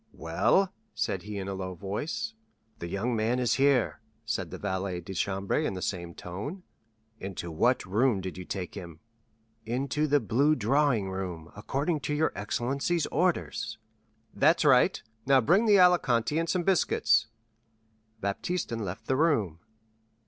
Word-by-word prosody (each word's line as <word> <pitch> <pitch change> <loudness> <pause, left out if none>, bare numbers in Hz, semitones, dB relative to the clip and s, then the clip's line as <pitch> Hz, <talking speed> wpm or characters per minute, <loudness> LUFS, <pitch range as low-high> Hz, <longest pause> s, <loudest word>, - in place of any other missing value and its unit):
"Well?" 180 - +1 0.2
said 95 - -1
he 105 +1 -6
in 95 -1 -4
a 100 - -3
low 95 -1 -5
voice. 125 - -4 0.5
"The 85 - -5
young 110 +7 -1
man 115 +3 +1
is 125 -4 +2
here," 135 -5 +3 0.2
said 105 -6 -2
the - - -7
valet 95 -2 -2
de 90 +3 -8
chambre 95 +1 -1
in 95 - -2
the 90 - -5
same 85 -3 -4
tone. 125 - -6 0.6
"Into 90 -3 -5
what 120 +11 +2
room 110 +3 +2
did 95 -1 -5
you 90 - -7
take 90 -1 -5
him?" 85 -5 -9 0.6
"Into 135 +6 -1
the 145 0 +4
blue 140 +5 +2
drawing 125 -4 +1
room, 90 -4 -5
according 140 - -1
to 150 +2 -2
your 160 +2 +2
excellency's 135 +10 -1
orders." 170 -10 0 0.6
"That's 165 -1 +3
right; 130 -4 +4 0.2
now 135 -1 +6
bring 185 - +3
the 205 -2 +6
Alicante 150 -9 +4
and 165 0 -1
some 180 -2 +1
biscuits." 115 - +3 0.9
Baptistin 115 - -2
left 105 +2 -5
the 130 - +1
room. 115 - +1
110 Hz, 150 wpm, -28 LUFS, 95-145 Hz, 0.9 s, now